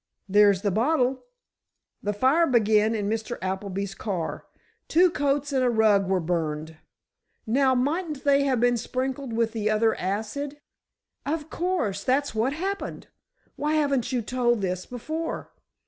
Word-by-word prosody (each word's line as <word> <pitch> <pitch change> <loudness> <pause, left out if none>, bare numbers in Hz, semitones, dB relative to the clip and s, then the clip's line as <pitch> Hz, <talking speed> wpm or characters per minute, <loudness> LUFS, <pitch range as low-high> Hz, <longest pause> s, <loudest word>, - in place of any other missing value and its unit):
"There's 200 -1 +4
the 200 - +1
bottle. 255 - +1 0.8
The 205 - -1
fire 265 +11 +3
began 220 -2 +3
in 205 -2 -2
Mr. 225 +2 -2
Appleby's 190 +1 -3
car. 190 -6 -4 0.4
Two 350 +2 +4
coats 285 -1 0
and 260 -1 +2
a 250 - +3
rug 215 -4 +3
were 190 -1 +2
burned—now, 165 - -2
mightn't 295 +3 -1
they 280 -1 +4
have 260 -3 +1
been 245 0 +3
sprinkled 260 +2 -3
with 225 0 0
the 215 -2 -1
other 220 +1 +3
acid——" 220 +10 -3 0.6
"Of 305 +1 -3
course 255 - -1
that's 275 +1 +1
what 225 +5 0
happened! 390 +5 -4 0.5
Why 300 +1 0
haven't 280 -6 +1
you 245 -3 0
told 240 -1 +1
this 185 -1 -2
before?" 315 +7 -5
240 Hz, 140 wpm, -26 LUFS, 205-280 Hz, 0.8 s, There's